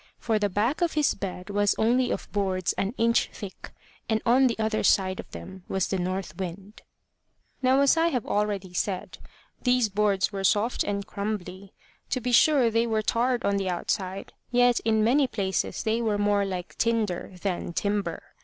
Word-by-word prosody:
For 220 -2 0
the 205 -1 +1
back 220 - 0
of 345 -2 +1
his 300 -2 +2
bed 185 0 -6
was 205 0 +2
only 245 +3 +2
of - - -3
boards 190 -3 0
an 200 +5 -2
inch 230 +1 +2
thick, 200 -3 -9 0.4
and 220 -1 +2
on 260 +3 +5
the 235 - -1
other 220 0 0
side 185 -2 +2
of - - -8
them 190 -1 -10
was 190 -1 0
the 190 - -1
north 185 +1 -3
wind. 190 +3 -7 0.8
Now, 260 +1 +4
as 280 +2 +5
I 325 +1 +3
have 250 -9 -1
already 200 -3 -1
said, 185 +1 -3 0.4
these 250 -3 +2
boards 200 -1 +1
were 195 -1 -4
soft 210 +5 +2
and 200 -1 -3
crumbly. 200 -2 -5 0.4
To 255 - 0
be 250 0 -2
sure, 255 -1 +5
they 230 +1 +2
were 220 -1 0
tarred 245 +3 +1
on 200 0 +2
the 195 -1 -1
outside, 185 +2 -3 0.2
yet 245 0 +4
in 220 -1 +1
many 265 +5 +3
places 195 -5 -2
they 225 +1 0
were 215 -3 0
more 205 -1 +2
like 185 -2 -6
tinder 215 -6 0
than 180 -2 -3
timber. 205 +3 -2
210 Hz, 180 wpm, -26 LUFS, 195-235 Hz, 0.8 s, on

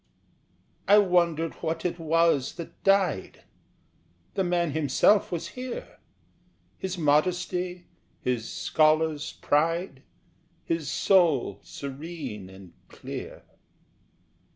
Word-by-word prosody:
I 205 - +7
wondered 170 -5 +2
what 160 0 -3
it 175 0 -1
was 165 -4 +2
that 170 -2 -10
died! 195 - +1 0.9
The 195 - 0
man 175 -3 +1
himself 155 +7 +3
was 170 -1 -3
here, 250 +2 -7 0.8
His 190 -1 -4
modesty, 180 +3 0 0.3
his 120 -3 -2
scholar's 155 -3 +1
pride, 160 -1 0 0.6
His 165 -3 -2
soul 160 - +3
serene 140 - -7
and 95 -2 -14
clear. - - -8
165 Hz, 90 wpm, -27 LUFS, 145-180 Hz, 0.9 s, I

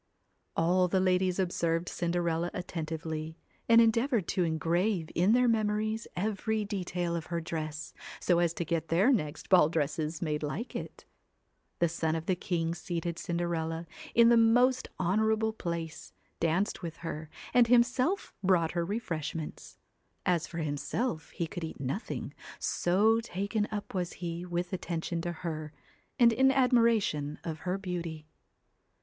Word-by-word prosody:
All 180 +2 +3
the 190 +1 +2
ladies 185 -1 +2
observed 170 -2 0
Cinderella 170 -1 0
attentively, 160 -2 -4 0.3
and 230 0 +8
endeavoured 230 - +3
to 185 - +1
engrave 165 +2 0
in 185 +6 +4
their 250 0 +4
memories 215 0 0
every 215 +2 -1
detail 180 -4 -2
of 165 -2 -4
her 170 -1 -1
dress, 155 -2 -5 0.3
so 175 -2 +3
as 170 -1 +3
to 170 - -2
get 165 0 -1
their 190 - +4
next 150 - -2
ball 175 -5 +6
dresses 155 0 -1
made 150 -3 -1
like 175 - -4
it. - - -6 0.7
The 170 - +3
son 160 -1 -1
of 165 0 -3
the 185 - +2
king 170 -2 -1
seated 170 0 -4
Cinderella 170 -1 -2 0.3
in 235 0 +7
the 235 - +6
most 245 +3 +4
honourable 220 +4 +2
place, 170 - -5 0.3
danced 170 +5 0
with 165 -3 -6
her, 155 -1 -5 0.2
and 245 -1 +6
himself 250 +9 +2
brought 180 -4 +3
her 170 -1 0
refreshments. 165 -6 -4 0.5
As 175 -3 +1
for 170 - -8
himself, 155 - -2
he 170 - -3
could 170 +1 -6
eat 160 - -6
nothing, 140 - -4 0.2
so 210 +6 +2
taken 210 0 -2
up 210 -1 -5
was 180 -2 -2
he 175 0 -5
with 175 +1 -2
attention 170 -2 -2
to 175 0 -2
her, 155 -2 -5 0.4
and 235 -3 +6
in 265 +3 +5
admiration 230 - +2
of 160 -2 -4
her 180 +3 -2
beauty. 170 -5 -5
175 Hz, 145 wpm, -30 LUFS, 165-210 Hz, 0.7 s, and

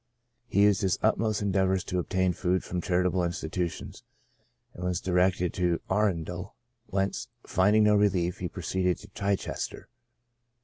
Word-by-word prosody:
He 100 - +3
used 105 -2 +4
his 95 -2 +1
utmost 110 -1 +1
endeavors 95 -2 +1
to 90 -2 -2
obtain 95 +1 +1
food 90 0 0
from 90 0 -3
charitable 90 +1 +1
institutions, 85 0 -4 0.7
and 90 - -9
was 90 -1 0
directed 90 -1 +1
to 90 -2 +1
Arun 95 -5 +2
del, 90 +4 -7 0.3
whence, 95 +1 -1 0.2
finding 105 +4 +3
no 105 0 +5
relief, 95 -4 +1
he 90 - -2
proceeded 90 0 -1
to 105 - -14
Chichester. 100 -1 -3
95 Hz, 140 wpm, -28 LUFS, 90-100 Hz, 0.7 s, no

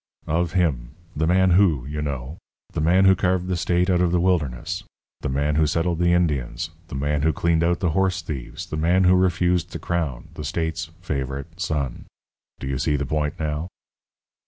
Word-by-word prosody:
"Of 85 +2 0
him. 70 -8 0 0.2
'The 80 +1 +1
man 95 +1 +4
who,' 85 -9 +4
you 75 +2 -4
know. 70 +1 -4 0.3
The - - -1
man 90 +5 +4
who 95 0 +7
carved 90 0 +1
the 90 0 -1
state 90 +1 +1
out 90 -2 +3
of 90 -2 +2
the 90 - +2
wilderness. 85 0 0 0.4
The - - -3
man 75 +3 0
who 80 -1 +4
settled 85 +2 0
the 85 0 +3
Indians. 75 -9 0 0.2
The - - -7
man 70 +2 0
who 80 +2 +3
cleaned 80 +2 +1
out 85 +1 +1
the 90 -4 +2
horse 95 0 +1
thieves. 70 -7 -6
The 75 - -5
man 85 +4 +3
who 90 0 +6
refused 90 -1 +2
the - - -3
crown. 80 -8 -3
The 75 - -7
state's 80 +2 -2 0.2
favourite 70 +2 -4
son. 75 -8 -2 0.5
Do - - -6
you 65 -1 -2
see 75 - +1
the 70 0 -1
point 75 +1 -2
now?" 75 +1 -2
80 Hz, 195 wpm, -23 LUFS, 75-90 Hz, 0.5 s, who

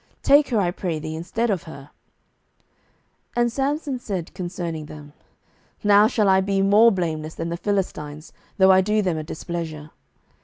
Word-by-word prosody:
take 285 +1 +5
her, 235 - 0
I 180 -3 +1
pray 175 -3 -3
thee, 155 +1 -5
instead 215 +8 -2
of 185 -5 -2
her. 140 -1 -12 1.4
07:015:003 240 - +2
And 240 0 +2
Samson 275 +1 -2
said 190 -8 -5
concerning 175 -3 -5
them, 150 -1 -12 0.7
Now 205 0 +6
shall 215 -2 +1
I 190 0 +4
be 195 0 0
more 210 +4 +6
blameless 160 -5 -3
than 165 - -4
the 170 - -2
Philistines, 170 -6 -3 0.2
though 190 -1 +6
I 190 0 +6
do 210 +2 +1
them 175 -4 -1
a - - -5
displeasure. 155 -1 -6
185 Hz, 165 wpm, -23 LUFS, 160-210 Hz, 1.4 s, Now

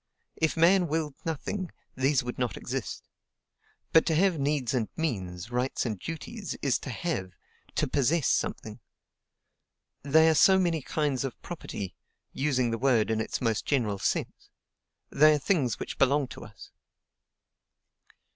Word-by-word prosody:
If 160 +1 0
man 175 +2 +5
willed 155 -1 -1
nothing, 170 +4 -3 0.2
these 135 +1 +2
would 125 0 -5
not 125 -2 -1
exist. 130 -2 -5 0.9
But 160 - +7
to 160 - +2
have 180 -1 +3
needs 140 -3 0
and 120 -4 0
means, 100 - -3
rights 125 +2 -1
and 110 -5 -3
duties, 195 - -6
is 135 -3 +2
to - - -7
HAVE, 105 - -3 0.4
to - - +1
POSSESS, 145 +2 +1
something. - - -1 1.2
They 160 +3 +5
are 160 - +5
so 190 +5 +6
many 170 -4 +1
kinds 140 -1 -1
of 135 -3 -5
property, 100 - -6 0.4
using 130 -4 +1
the 115 - -2
word 120 -5 +3
in 110 0 +1
its 110 - -3
most 115 -4 0
general 110 -8 0
sense: - - -2 0.6
they 155 +2 +6
are - - +1
things 140 - +1
which - - -6
belong 140 +1 +3
to - - -9
us." - - -14
140 Hz, 145 wpm, -28 LUFS, 120-160 Hz, 1.2 s, But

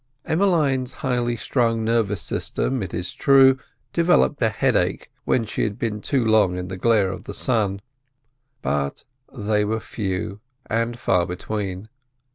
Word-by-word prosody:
Emmeline's 150 -8 +1
highly 120 -2 0
strung 115 -1 0
nervous 110 -6 +1
system, 130 - -2
it 95 -4 -4
is 90 - -4
true, 135 -1 +5 0.3
developed 170 -4 +3
a 110 - +4
headache 105 - 0
when 115 - +1
she 105 - -3
had 105 -1 -1
been 110 -3 -3
too 130 0 0
long 105 -5 +3
in 90 0 -5
the 95 - -4
glare 100 -1 +2
of 95 - -8
the - - -6
sun, 105 -6 +1 0.8
but 70 -1 -1 0.3
they 105 -3 0
were 110 +2 -1
few 100 -2 -4 0.3
and 115 +1 -1
far 90 -6 +1
between. 95 +1 -4
110 Hz, 145 wpm, -23 LUFS, 95-125 Hz, 0.8 s, true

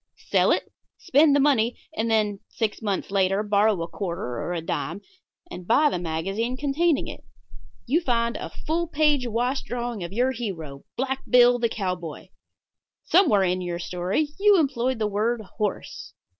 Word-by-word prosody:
Sell - - +2
it. - - +2 0.3
Spend 285 +1 +4
the - - +4
money, 255 -5 +2 0.2
and 225 +1 -1
then, 210 -3 +1
six 220 -1 -2
months 200 -3 -2
later, 195 +1 +2
borrow 210 -1 +2
a - - -5
quarter 170 - -4
(or - - -4
a 175 - -1
dime), 165 +2 -3 0.5
and 180 -1 -8
buy 295 +5 +4
the - - -2
magazine 195 +9 -2
containing 295 +3 +1
it. - - -9 0.6
You 300 +8 +2
find 235 -5 0
a - - -5
full 335 +2 -2
page 295 -5 +2
wash 245 +4 -1
drawing 240 -4 -4
of 170 - -6
your 250 +5 +1
hero, 165 - -6
Black 265 +1 -1
Bill, 245 0 +6
the 235 -1 +1
cowboy. 180 -7 -4 0.7
Somewhere 310 - +4
in 185 0 0
your 175 -1 -3
story 180 - -1
you 410 0 +6
employed 260 -4 0
the 220 - 0
word 215 +3 0 0.2
"horse." 210 -3 -4
225 Hz, 165 wpm, -25 LUFS, 190-265 Hz, 0.7 s, Bill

